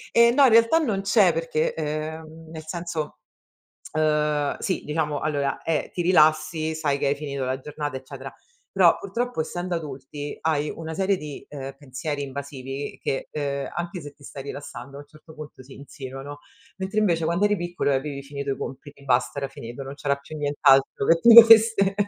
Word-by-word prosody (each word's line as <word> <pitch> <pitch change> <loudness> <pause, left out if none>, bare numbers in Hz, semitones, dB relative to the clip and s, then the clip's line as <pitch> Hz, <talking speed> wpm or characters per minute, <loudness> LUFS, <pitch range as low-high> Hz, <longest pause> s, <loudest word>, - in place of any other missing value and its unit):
E 235 0 +7
no, 280 +4 +4
in - - +6
realtà 230 +8 +5
non 220 -11 -1
c'è 195 -2 +4
perché, 165 -1 -1
ehm, 160 +1 -5
nel 160 -1 -8
senso, 165 -2 -4 0.8
uhm, 150 -2 +1
sì, 185 - -2
diciamo 150 -1 -1
allora, 145 -2 -1
è 165 -2 -1
ti - - -4
rilassi, 155 -2 +3
sai 150 -3 0
che - - -1
hai 140 - +2
finito 140 -2 -4
la 130 +1 -2
giornata, 145 0 -5
eccetera, 135 0 -10 0.4
però - - +5
purtroppo 245 - -2
essendo 175 +2 -4
adulti 145 -2 -6
hai 150 -2 0
una 160 0 -6
serie 190 +2 +1
di, 150 -3 -8
ehm, 135 -2 -7
pensieri 145 +2 -5
invasivi 140 0 -6
che, 135 - -2
ehm, 140 -2 -3
anche 175 +1 -4
se 145 -2 -9
ti 140 - -20
stai 135 -1 -8
rilassando 140 -2 -8
a - - -8
un 145 - -13
certo 155 +2 -17
punto 150 -3 -10
si 130 +1 -14
insinuano. 140 0 -9 0.4
Mentre 190 +3 -3
invece 170 -6 +1
quando 170 +4 +1
eri 205 0 +3
piccolo 175 -4 -2
e - - +2
avevi 140 0 -4
finito 140 0 -4
i - - -4
compiti, 140 +2 -8
basta 130 +1 +1
era 140 - -2
finito, 120 0 -9
non 135 +1 -7
c'era 140 -1 0
più 140 +2 -12
nient'altro 140 -2 +3
che 165 0 +4
ti 235 +3 +8
dovesse 225 -3 +8
150 Hz, 185 wpm, -24 LUFS, 140-170 Hz, 0.8 s, ti